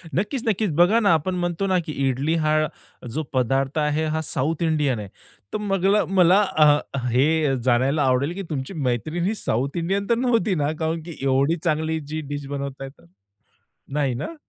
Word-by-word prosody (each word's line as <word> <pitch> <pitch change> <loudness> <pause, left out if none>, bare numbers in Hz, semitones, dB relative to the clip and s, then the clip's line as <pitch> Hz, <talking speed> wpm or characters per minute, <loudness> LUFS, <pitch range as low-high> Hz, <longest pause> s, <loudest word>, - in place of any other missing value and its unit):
नक्कीच, 215 - -1
नक्कीच. 210 -3 +1
बघा 180 +8 +5
ना, 205 -6 +4
आपण 175 +4 0
म्हणतो 175 +2 -1
ना 185 - +2
की 155 - -5 0.2
इडली 140 +6 0
हा 155 0 +3 0.6
जो 155 - -1
पदार्थ 135 +3 0
आहे, 150 +1 0
हा 155 0 -1
साउथ 155 +4 -1
इंडियन 150 -7 +1
आहे. 105 - -6 0.5
तर - - 0
मगला 195 0 +2
मला 190 +1 +4
अ, 170 -7 +3 0.4
हे 145 +3 +2
जाणायला 130 +4 +2
आवडेल 130 +5 +1
की 195 +2 -5
तुमची 140 +3 -4 0.2
मैत्रीण 155 +9 -2
ही 215 +4 0
साउथ 135 - -2
इंडियन 195 +4 -1
तर 235 - +4
नव्हती 230 -6 +1
ना? 150 -1 0
कारण 160 0 -1
की 170 -1 -8
एवढी 135 +4 +2
चांगली 160 -1 0
जी 155 +1 -5
डीश 145 -1 -4
बनवताय 140 -1 -5
तर? 110 -11 -22 0.9
नाही 140 -4 +1
ना? 235 - -5
155 Hz, 180 wpm, -23 LUFS, 140-185 Hz, 0.9 s, बघा